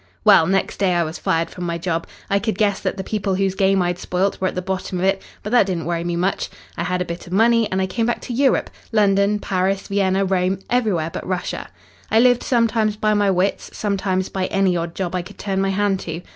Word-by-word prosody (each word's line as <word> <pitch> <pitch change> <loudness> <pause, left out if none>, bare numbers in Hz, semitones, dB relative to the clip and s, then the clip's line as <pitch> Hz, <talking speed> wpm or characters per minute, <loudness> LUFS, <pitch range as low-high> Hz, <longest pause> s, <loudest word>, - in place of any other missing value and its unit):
"Well, 160 - +6
next 195 +1 0
day 185 -3 +2
I 170 - +3
was 160 +1 -5
fired 165 0 0
from 180 - -7
my 170 -1 -2
job. 165 -1 -2 0.2
I 200 - +2
could 210 -1 -2
guess 205 -2 +2
that - - -2
the 190 - -3
people 195 -2 -1
whose 195 0 +1
game 195 -1 +2
I'd 175 0 -1
spoilt 185 +3 -1
were 185 - +2
at - - -4
the 180 - -1
bottom 185 0 -3
of 175 - -2
it, 195 0 +2 0.2
but 210 - -5
that 240 -5 +5
didn't 175 -4 -2
worry 170 0 -1
me 175 0 -2
much. 180 +3 -1 0.3
I - - -4
had 180 +1 0
a - - -12
bit 170 +1 -7
of 175 - -7
money 225 +1 +3
and 190 - 0
I 190 - +2
came 225 +5 -1
back 240 - 0
to 245 - -5
Europe 270 +2 +2 0.2
London, 200 -1 +3
Paris, 195 -1 -1
Vienna, 195 -1 +1
Rome 185 0 +1
everywhere 200 -10 +1
but - - -6
Russia. 185 -1 -3 0.4
I 220 - +4
lived 245 0 +5
sometimes 230 -3 +1
by 215 0 +2
my 205 -1 +2
wits, 190 +1 0
sometimes 195 -2 -1
by 185 -1 -2
any 195 -2 +2
odd 170 0 -3
job 185 -2 -3
I 180 - 0
could 195 +4 -12
turn 195 -1 -1
my 195 - +1
hand 195 0 +1
to. 165 0 -6
190 Hz, 245 wpm, -21 LUFS, 180-205 Hz, 0.4 s, Well